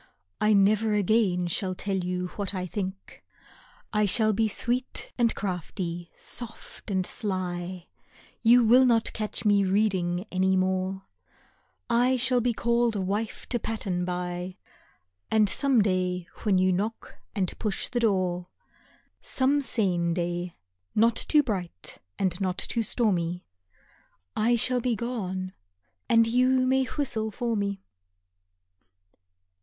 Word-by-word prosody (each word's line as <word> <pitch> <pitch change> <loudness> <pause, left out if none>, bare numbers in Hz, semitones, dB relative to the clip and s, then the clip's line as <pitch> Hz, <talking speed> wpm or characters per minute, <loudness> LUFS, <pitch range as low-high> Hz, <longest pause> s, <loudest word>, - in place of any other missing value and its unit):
I 215 0 +4
never 210 +2 +3
again 200 -3 +2
shall 185 +2 0
tell 195 +1 -2
you 180 0 -2
what 200 0 -4
I 185 -1 -2
think. 190 +1 -6 0.7
I 210 -1 +2
shall 215 +2 +2
be 220 +2 +2
sweet 245 +4 -1
and 235 -2 +2
crafty, 175 -2 -4
soft 240 -2 -4
and 190 -2 0
sly; 180 -3 -4 0.6
You 240 +1 +6
will 245 +4 +6
not 230 -3 +2
catch 215 0 -3
me 205 -1 +4
reading 190 -2 +1
any 190 0 +2
more; 185 +1 -1 0.8
I 250 +2 +3
shall 250 0 +3
be 245 +1 +1
called 235 0 +1
a - - -1
wife 205 +4 -3
to 240 - 0
pattern 195 -6 -2
by; 180 0 -4 0.7
And 215 -1 +4
some 265 0 +2
day 180 -2 0 0.2
when 200 -4 +2
you 185 0 +3
knock 215 +5 -4 0.2
and 190 -4 -1
push 210 -3 -1
the 245 - -2
door, 185 -5 0 0.7
Some 275 +2 +2
sane 180 -10 +1
day, 175 0 -3 0.4
not 230 +2 +4
too 300 -1 +3
bright 180 - -5 0.2
and 185 -1 -1
not 185 -1 -1
too 230 - -1
stormy, 180 -7 0 0.9
I 235 +3 +3
shall 250 +2 +3
be 240 -1 0
gone, 190 -5 -4 0.6
and 230 0 +5
you 255 +2 +3
may 265 +1 +2
whistle 235 -7 -2
for 235 +2 -2
me. 200 -1 -2
200 Hz, 130 wpm, -27 LUFS, 185-230 Hz, 0.9 s, You